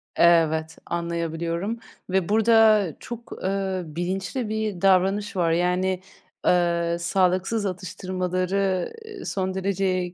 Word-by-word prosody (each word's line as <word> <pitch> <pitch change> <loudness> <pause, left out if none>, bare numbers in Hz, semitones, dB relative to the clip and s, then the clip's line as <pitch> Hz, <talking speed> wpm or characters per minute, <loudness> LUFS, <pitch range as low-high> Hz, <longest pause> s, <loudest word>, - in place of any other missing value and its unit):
Evet, 160 -2 +3
anlayabiliyorum 170 +4 -2 0.3
ve 190 -1 +1
burada 220 -3 +5
çok, 235 -1 -8
ııı, 190 -1 -1
bilinçli 190 +7 -2
bir 215 -4 -2
davranış 195 +2 +3
var. 170 -3 +2
Yani, 180 +2 +1 0.5
ııı, 170 -1 +2
sağlıksız 185 +4 +1
atıştırmaları, 185 0 -1
eee, 425 -3 -9
son 190 -1 -2
derece 185 -2 -1
185 Hz, 100 wpm, -24 LUFS, 175-195 Hz, 0.5 s, burada